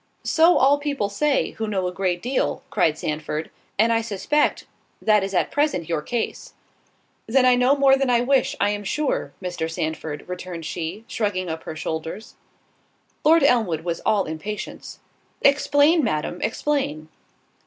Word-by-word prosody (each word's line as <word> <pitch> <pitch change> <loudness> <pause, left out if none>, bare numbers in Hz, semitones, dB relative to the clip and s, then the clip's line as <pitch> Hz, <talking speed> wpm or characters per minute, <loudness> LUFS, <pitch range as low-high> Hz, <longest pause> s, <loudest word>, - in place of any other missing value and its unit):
"So 330 +2 +4
all 280 +2 +4
people 280 -8 -2
say, 280 +7 +1
who 220 - -4
know 195 -3 -1
a 180 - -1
great 180 -2 -1
deal," 255 +2 -1
cried 165 -6 +2
Sandford, 155 +1 -4 0.3
"and 225 +3 +4
I 225 - +2
suspect 230 +7 0 0.3
that 210 -2 +3
is 195 0 -3
at - - +1
present 290 - 0
your 165 -3 -1
case." 235 +8 -4 0.7
"Then 255 +3 +3
I 255 - +6
know 250 +3 +4
more 275 -1 +5
than 270 -1 0
I 240 -1 +3
wish, 265 +1 +2
I 205 - +2
am 205 0 -4
sure, 295 +8 -1
Mr. 175 -3 -3
Sandford," 155 -2 -4
returned 180 -2 -6
she, 175 +7 -5
shrugging 185 -5 -2
up 160 0 -5
her 155 - -6
shoulders. 160 +6 -5 0.9
Lord 320 +1 +5
Elmwood 220 - +2
was 170 0 -3
all 205 -3 +2
impatience. 195 +7 -6 0.5
"Explain, 290 +3 +4
Madam, 175 -3 -2
explain." 225 - -1
210 Hz, 155 wpm, -23 LUFS, 170-270 Hz, 0.9 s, I